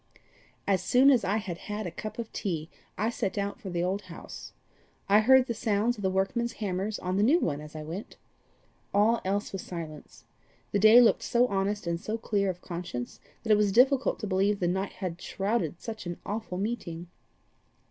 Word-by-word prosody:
"As 195 Hz, -2 st, +2 dB
soon 260 Hz, +7 st, +6 dB
as 255 Hz, -, +3 dB
I 200 Hz, +3 st, +1 dB
had 190 Hz, -6 st, -5 dB
had 210 Hz, 0 st, -3 dB
a 175 Hz, -, -4 dB
cup 215 Hz, +5 st, -7 dB
of 230 Hz, -2 st, -6 dB
tea, 165 Hz, -5 st, -3 dB, 0.3 s
I 220 Hz, +2 st, 0 dB
set 205 Hz, -4 st, -3 dB
out 200 Hz, 0 st, -2 dB
for 195 Hz, -, -6 dB
the 175 Hz, -1 st, -1 dB
old 190 Hz, +3 st, -1 dB
house. 170 Hz, -, -9 dB, 0.6 s
I 205 Hz, +2 st, +6 dB
heard 260 Hz, +3 st, +6 dB
the 235 Hz, -, -2 dB
sounds 220 Hz, +1 st, +1 dB
of 210 Hz, -, -9 dB
the 190 Hz, -, +1 dB
workmen's 210 Hz, +5 st, 0 dB
hammers 200 Hz, +1 st, -2 dB
on 185 Hz, +1 st, -2 dB
the -, -, +3 dB
new 265 Hz, +11 st, +5 dB
one 150 Hz, -, -1 dB
as 150 Hz, +1 st, -11 dB
I 155 Hz, -, -5 dB
went. 170 Hz, +7 st, -7 dB, 0.8 s
All 220 Hz, +3 st, +4 dB
else 200 Hz, +2 st, -1 dB
was 195 Hz, -, -3 dB
silence. 160 Hz, -4 st, -8 dB, 0.5 s
The 200 Hz, -, +1 dB
day 215 Hz, +4 st, +8 dB
looked 240 Hz, -2 st, +5 dB
so 240 Hz, +1 st, +3 dB
honest 200 Hz, -2 st, -1 dB
and 170 Hz, 0 st, -2 dB
so 220 Hz, +1 st, -3 dB
clear 200 Hz, -3 st, 0 dB
of 180 Hz, -1 st, -5 dB
conscience 170 Hz, -9 st, -5 dB, 0.2 s
that 220 Hz, -, 0 dB
it 210 Hz, -, +7 dB
was 210 Hz, -1 st, +2 dB
difficult 265 Hz, +5 st, +4 dB
to -, -, -2 dB
believe 200 Hz, +1 st, +1 dB
the 175 Hz, -, +1 dB
night 190 Hz, +3 st, -1 dB
had 180 Hz, -3 st, -5 dB
shrouded 195 Hz, -5 st, -1 dB
such 220 Hz, -5 st, -7 dB
an 175 Hz, -, -4 dB
awful 210 Hz, -3 st, -4 dB
meeting. 195 Hz, -5 st, -3 dB
200 Hz, 200 wpm, -28 LUFS, 180-220 Hz, 0.8 s, day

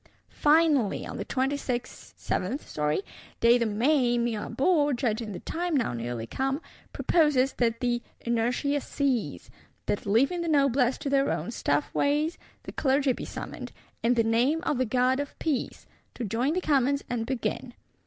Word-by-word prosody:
—Finally, 295 Hz, -7 st, +3 dB
on -, -, -6 dB
the -, -, -4 dB
27th 250 Hz, -, -2 dB, 0.4 s
day 235 Hz, +1 st, +5 dB
of 230 Hz, -, +1 dB
May, 240 Hz, +2 st, +2 dB
Mirabeau, 275 Hz, -, +1 dB
judging 230 Hz, -3 st, -1 dB
the 185 Hz, -, -7 dB
time 345 Hz, -2 st, -1 dB
now 240 Hz, -, 0 dB
nearly 120 Hz, -1 st, -4 dB
come, 270 Hz, -, -1 dB, 0.3 s
proposes 295 Hz, -6 st, +2 dB
that 230 Hz, 0 st, +1 dB
"the 240 Hz, -1 st, 0 dB, 0.2 s
inertia 245 Hz, +5 st, 0 dB
cease;" 265 Hz, -6 st, -2 dB, 0.3 s
that, 205 Hz, -, -2 dB
leaving 270 Hz, -, +2 dB
the 340 Hz, -, -3 dB
Noblesse 275 Hz, -4 st, +3 dB
to 280 Hz, -, -4 dB
their 275 Hz, 0 st, +3 dB
own -, -, -2 dB
stiff -, -, -1 dB
ways, 300 Hz, +4 st, +1 dB, 0.2 s
the -, -, -7 dB
Clergy 270 Hz, -1 st, +2 dB
be -, -, -6 dB
summoned, -, -, -7 dB, 0.3 s
"in 240 Hz, +2 st, +3 dB
the 230 Hz, -, +3 dB
name 240 Hz, +8 st, +2 dB
of 290 Hz, -7 st, 0 dB
the 255 Hz, -, +2 dB
God 255 Hz, +3 st, +2 dB
of 285 Hz, -1 st, -5 dB
Peace," 295 Hz, -6 st, -2 dB, 0.3 s
to 250 Hz, -, -4 dB
join 235 Hz, +8 st, 0 dB
the 365 Hz, -, 0 dB
Commons, 280 Hz, -3 st, +2 dB
and 230 Hz, -2 st, -2 dB
begin. 255 Hz, -1 st, -3 dB
255 Hz, 155 wpm, -27 LUFS, 235-285 Hz, 0.4 s, day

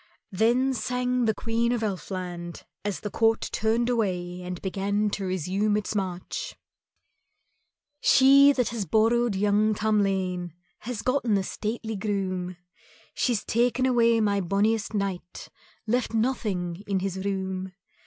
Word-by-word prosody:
Then 240 Hz, +7 st, +2 dB
sang 250 Hz, 0 st, 0 dB
the 220 Hz, -, +2 dB
Queen 230 Hz, +2 st, 0 dB
of 240 Hz, -2 st, 0 dB
Elfland 180 Hz, -4 st, -5 dB, 0.2 s
as 205 Hz, -1 st, -3 dB
the 210 Hz, -, -5 dB
court 225 Hz, 0 st, +2 dB
turned 225 Hz, +2 st, +1 dB
away 180 Hz, -7 st, -1 dB
and 180 Hz, -1 st, -5 dB
began 200 Hz, +2 st, -1 dB
to 195 Hz, -, -3 dB
resume 190 Hz, +4 st, 0 dB
its 210 Hz, -, -3 dB
march: 185 Hz, -3 st, -4 dB, 1.4 s
"She 275 Hz, +2 st, +7 dB
that 250 Hz, -4 st, 0 dB
has 230 Hz, -4 st, -3 dB
borrowed 230 Hz, +1 st, +2 dB
young 210 Hz, +2 st, +2 dB
Tamlane 190 Hz, -5 st, 0 dB, 0.3 s
Has 230 Hz, -3 st, -5 dB
gotten 250 Hz, -5 st, +1 dB
a 195 Hz, -, 0 dB
stately 220 Hz, +3 st, -4 dB
groom, 185 Hz, -3 st, -2 dB, 0.6 s
She's 240 Hz, -5 st, 0 dB
taken 245 Hz, +2 st, +1 dB
away 235 Hz, -2 st, +4 dB
my 200 Hz, -2 st, +2 dB
bonniest 205 Hz, +4 st, 0 dB
knight, 195 Hz, -3 st, -4 dB, 0.4 s
Left 235 Hz, 0 st, 0 dB
nothing 205 Hz, -7 st, -1 dB
in 195 Hz, -2 st, 0 dB
his 190 Hz, 0 st, -3 dB
room. 190 Hz, -1 st, -3 dB
210 Hz, 130 wpm, -26 LUFS, 190-230 Hz, 1.4 s, She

